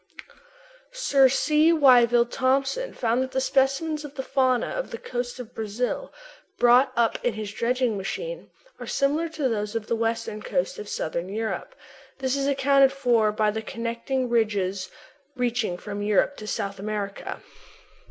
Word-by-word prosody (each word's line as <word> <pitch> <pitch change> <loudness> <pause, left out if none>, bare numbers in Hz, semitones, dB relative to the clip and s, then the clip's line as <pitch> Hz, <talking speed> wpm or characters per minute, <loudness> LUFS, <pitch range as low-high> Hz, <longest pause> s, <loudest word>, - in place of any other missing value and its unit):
Sir 275 - +4
C. 305 +4 +3
Wyville 245 -6 +5
Thomson 275 - 0
found 235 +1 0
that 260 0 -4
the 265 - +1
specimens 275 +4 +1
of 295 -1 -9
the 265 - -4
fauna 260 -2 +2
of - - -4
the - - -6
coast 245 0 -5
of 245 -1 -9
Brazil, 225 - -3 0.5
brought 250 +2 +5
up 235 -1 +1
in 240 -4 0
his 210 -1 -5
dredging 240 -1 0
machine, - - -5 0.3
are - - -7
similar 300 +4 0
to 310 -4 -1
those 210 -2 -2
of 225 -2 -2
the 230 - -1
western 225 -1 -2
coast 185 -3 -2
of 210 - -7
Southern 170 +3 -3
Europe. 220 - -4 0.4
This 265 0 -1
is 275 0 0
accounted 275 -1 +4
for 240 -6 +2
by 215 0 +1
the 220 +1 -3
connecting 235 +3 -3
ridges 200 -5 0 0.5
reaching 240 -7 -1
from 205 +2 -6
Europe 210 +7 +2
to 215 - -8
South 200 -3 -3
America. 205 -1 -5
245 Hz, 155 wpm, -25 LUFS, 215-270 Hz, 0.5 s, Wyville